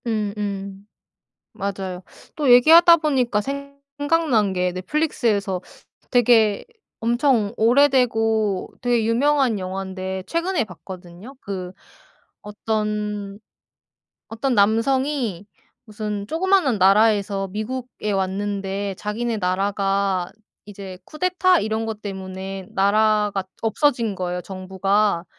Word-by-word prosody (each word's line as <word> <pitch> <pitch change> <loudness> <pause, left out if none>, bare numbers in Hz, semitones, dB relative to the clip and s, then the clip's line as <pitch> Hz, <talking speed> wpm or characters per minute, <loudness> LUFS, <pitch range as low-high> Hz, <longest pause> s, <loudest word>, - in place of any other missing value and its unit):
음 215 -3 -1
음 200 -1 -5 0.7
맞아요. 190 -2 -4 0.4
또 295 -4 +1
얘기하다 330 +7 +8
보니까 260 -9 +1
생각난 280 -3 -1
게 180 0 0
넷플릭스에서 200 - -1 0.5
되게 225 -4 +4 0.4
엄청 235 -2 +1
오래되고 225 -5 +2
되게 240 -3 +1
유명한 255 -1 +2
영환데 190 0 -5
최근에 340 0 0
봤거든요. 185 - -11
그 185 -2 -6 0.7
어떤, 210 -1 -3 0.9
어떤 240 +4 -1
남성이 230 - +1 0.4
무슨 210 -1 -5
쪼그마한 335 - +2
나라에서 200 0 +3
미국에 215 +2 -5
왔는데 195 0 -2
자기네 225 +2 -3
나라가 195 -1 0 0.4
이제 195 -2 -9
쿠데타 365 +2 +2
이런 220 +1 -2
거 225 - -2
때문에 190 -2 -7
나라가 210 0 +2 0.2
없어진 230 -2 +1
거예요 180 -1 -3
정부가. 190 0 0
210 Hz, 235 characters per minute, -22 LUFS, 195-245 Hz, 0.9 s, 얘기하다